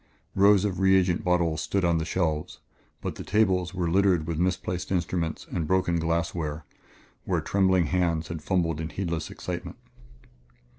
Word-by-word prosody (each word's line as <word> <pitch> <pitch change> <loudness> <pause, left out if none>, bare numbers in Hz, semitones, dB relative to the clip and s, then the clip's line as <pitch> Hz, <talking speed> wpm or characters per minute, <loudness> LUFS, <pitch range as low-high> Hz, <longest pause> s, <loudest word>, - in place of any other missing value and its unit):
Rows 100 0 +5
of 95 -3 -2
reagent 95 -2 +3
bottles 85 -3 +1
stood 95 +4 0
on 85 -1 +2
the 80 - -2
shelves, 80 -4 -1 0.4
but - - -3
the - - -8
tables 95 -4 +1
were 90 -2 -1
a 85 - -1
litter 95 0 +4
of 80 -1 -3
misplaced 90 0 -1
instruments 85 -2 -1
and 80 -3 -2
broken 85 -1 +1
glassware 80 -2 -2 0.6
where - - 0
trembling 95 -3 +2
hands 85 -2 0
had 85 -2 -5
fumbled 80 -1 0
in 80 - -4
heedless 85 -5 -3
excitement. - - -6
85 Hz, 155 wpm, -26 LUFS, 80-95 Hz, 0.6 s, Rows